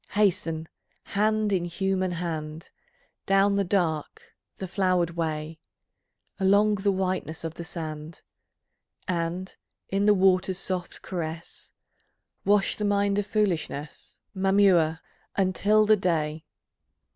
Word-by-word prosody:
Hasten, 175 Hz, -6 st, +1 dB, 0.4 s
hand 215 Hz, 0 st, +1 dB
in 175 Hz, -2 st, +1 dB
human 185 Hz, +1 st, -1 dB
hand, 160 Hz, -2 st, -5 dB, 0.6 s
Down 195 Hz, 0 st, +4 dB
the 200 Hz, -, +2 dB
dark, 170 Hz, -5 st, -2 dB, 0.2 s
the 190 Hz, -, -5 dB
flowered 180 Hz, -2 st, +1 dB
way, 160 Hz, -1 st, -3 dB, 0.8 s
Along 200 Hz, +2 st, +4 dB
the 200 Hz, 0 st, +1 dB
whiteness 185 Hz, -4 st, -2 dB
of 165 Hz, -1 st, -4 dB
the 170 Hz, -, -7 dB
sand, 160 Hz, -2 st, -7 dB, 0.8 s
And 175 Hz, +1 st, -2 dB, 0.3 s
in 200 Hz, +2 st, +1 dB
the 210 Hz, -, +6 dB
water's 185 Hz, -1 st, +3 dB
soft 185 Hz, -2 st, -4 dB
caress, 165 Hz, -2 st, -6 dB, 0.7 s
Wash 205 Hz, 0 st, +3 dB
the 210 Hz, -, -3 dB
mind 200 Hz, 0 st, +2 dB
of 205 Hz, -, -3 dB
foolishness, 175 Hz, -8 st, -2 dB, 0.2 s
Mamua, 190 Hz, -5 st, +3 dB, 0.3 s
until 200 Hz, +3 st, +3 dB
the 215 Hz, 0 st, +5 dB
day. 160 Hz, -4 st, -1 dB
185 Hz, 110 wpm, -26 LUFS, 165-200 Hz, 0.8 s, the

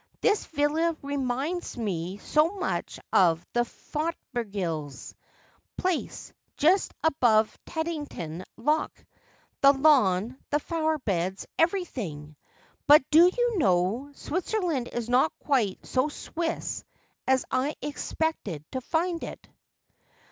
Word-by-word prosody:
' -, -, -43 dB
This 425 Hz, -1 st, +2 dB
villa 315 Hz, +2 st, +1 dB
remini.ls 280 Hz, +4 st, -2 dB
me 190 Hz, -4 st, -3 dB
so 305 Hz, +9 st, +2 dB
much 380 Hz, -2 st, -3 dB
of 170 Hz, -3 st, +4 dB
the 240 Hz, -, +1 dB
Fothergills' 205 Hz, -, -4 dB, 0.6 s
place 365 Hz, -3 st, -2 dB, 0.2 s
just 355 Hz, +7 st, +3 dB
above 235 Hz, -8 st, +3 dB
Teddington 295 Hz, -, -4 dB
Lock 300 Hz, +7 st, +1 dB, 0.4 s
— -, -, -36 dB
the 275 Hz, 0 st, +8 dB
lawn 255 Hz, -6 st, +3 dB
— -, -, -45 dB
the 295 Hz, -, +2 dB
flowerbeds 285 Hz, -, -1 dB
— -, -, -17 dB
everything. 230 Hz, -, -1 dB, 0.5 s
But.doyou 350 Hz, -, +5 dB
know, 195 Hz, -, +2 dB
Switzerland 345 Hz, -, -1 dB
is 240 Hz, -1 st, -3 dB
not 255 Hz, +6 st, +2 dB
quite 240 Hz, -10 st, 0 dB
so 260 Hz, +3 st, +1 dB
Swiss 325 Hz, +2 st, -4 dB, 0.4 s
as 260 Hz, 0 st, +3 dB
I 280 Hz, +4 st, 0 dB
expected 290 Hz, -, -3 dB
to 260 Hz, -, -3 dB
find 335 Hz, +5 st, -1 dB
it.' -, -, -8 dB
275 Hz, 110 wpm, -27 LUFS, 210-320 Hz, 0.6 s, the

